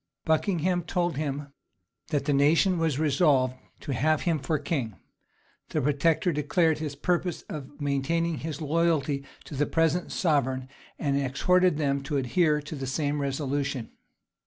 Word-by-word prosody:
Buckingham 175 +2 +1
told 175 -1 -1
him 140 -1 -4 0.5
that 145 -4 -1
the 145 - +2
nation 165 +6 +4
was 160 -5 +1
resolved 140 -4 +3 0.3
to 140 - -3
have 155 +5 +2
him 165 -3 +1
for 145 +3 0
king: 140 - -2 0.7
the - - -1
protector 150 +5 +2
declared 150 +2 +2
his 150 -2 -4
purpose 175 +3 -1
of 145 -1 -8
maintaining 150 +3 0
his 155 -1 -5
loyalty 155 -3 +1 0.2
to - - -9
the 145 +2 +1
present 165 +2 +1
sovereign, 130 -6 +1 0.3
and 140 -2 0
exhorted 180 +6 +2
them 140 -2 0
to 140 +1 -2
adhere 150 +4 +2
to 150 - -6
the 135 -2 -5
same 145 +2 -1
resolution. 140 -2 -2
150 Hz, 145 wpm, -27 LUFS, 140-165 Hz, 0.7 s, nation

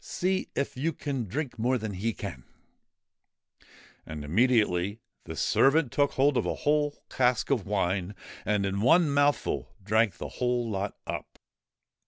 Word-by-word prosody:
See 185 +1 -1
if 140 - -2
you 155 +6 -1
can 135 -6 -3
drink 125 - -4
more 125 +3 +2
than 110 -3 -4
he 105 +5 -1
can! 65 - -7 0.8
' - - -27
And 75 -2 -6
immediately 105 - +2 0.3
the - - -6
servant 140 -1 +3
took 145 -1 +2
hold 135 0 +3
of - - +1
a - - -1
whole 145 -1 +1
cask 125 +1 +1
of 115 -8 +1
wine, 95 -1 -1 0.3
and 105 -1 +1
in 100 +1 -1
one 160 +6 +5
mouthful 145 0 +1
drank 110 -2 +2
the - - -5
whole 125 -1 -1
lot 100 -2 -3
up. - - -6
120 Hz, 155 wpm, -28 LUFS, 100-140 Hz, 0.8 s, one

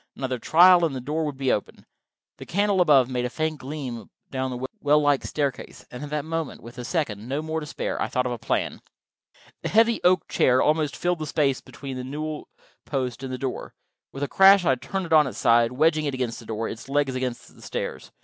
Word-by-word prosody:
Another 130 -2 -3
trial, 175 +6 +6
and 155 -5 0
the - - -3
door 150 +5 -2
would 145 -3 -5
open. 105 - -2 0.5
The - - -9
candle 200 0 +2
above 140 -7 +5
made 125 -1 -2
a 125 - -1
faint 155 +2 -2
gleam 130 -4 -6 0.2
down 130 -1 -2
the 125 0 -4
well 145 +1 +4
like 145 -2 +2
staircase, 140 -4 -4
and 125 - -8
at 145 - -6
that 150 0 -2
moment, 165 -2 -4
with 120 +2 -11
a - - -5
second, 120 - -3
no 145 +3 -2
more, 160 0 -2
to 150 - -7
spare, - - -3
I - - 0
thought 125 -1 -1
of 125 - -1
a 120 - -4
plan. - - -2 0.8
The - - -3
heavy 225 +1 +3
oak 180 +1 +3
chair 130 0 +3
almost 150 0 +1
filled 175 -1 -1
the 155 - -4
space 140 -3 +1
between 135 -2 -8
the 125 - -5
newel 150 +3 -5 0.3
post 130 -3 -3
and 135 -1 -5
the 130 - -3
door. 130 0 -5 0.4
With 135 - -5
a - - 0
crash 195 +1 +6
I - - +3
had 130 -2 +1
turned 195 -2 -3
it 165 - -2
on 155 -3 +6
its 110 -5 -7
side, 115 0 +4
wedging 155 +3 +2
it 140 -2 -1
against 125 -3 -3
the 115 - -13
door, 110 0 -3
its 115 +4 -8
legs 140 -1 +1
against 130 -1 -4
the - - -18
stairs. - - -5
140 Hz, 230 wpm, -25 LUFS, 125-155 Hz, 0.8 s, trial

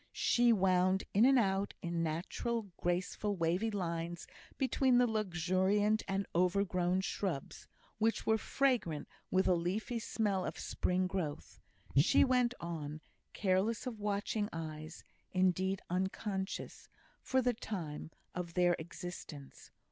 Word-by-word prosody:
She 240 0 +4
wound 185 -2 +3
in 210 +4 +6
and 270 0 +6
out 195 -3 +1
in 170 -1 -1
natural, 195 +7 -2
graceful, 180 +4 -1
wavy 180 +5 +1
lines 170 -4 -3 0.3
between 260 -1 +3
the 245 - +6
luxuriant 205 0 +1
and 195 0 -1
overgrown 180 0 +2
shrubs, 185 -7 -3 0.3
which 225 +1 +1
were 220 0 +3
fragrant 235 - 0 0.2
with 190 +1 +2
a - - +5
leafy 190 +7 -1
smell 205 -4 0
of - - -4
spring 185 +1 0
growth; 180 -6 -4 0.4
she 140 +5 +6
went 250 -2 +2
on, 155 -3 -5 0.3
careless 200 +5 +1
of 235 -4 -5
watching 205 +1 -1
eyes, 155 0 -6 0.3
indeed 185 +1 +1
unconscious, 190 +2 -3 0.3
for 260 - +1
the 245 0 +2
time, 170 -10 -5 0.2
of 175 -1 -5
their 175 -1 +4
existence. 160 -4 -8
190 Hz, 125 wpm, -34 LUFS, 175-215 Hz, 0.4 s, in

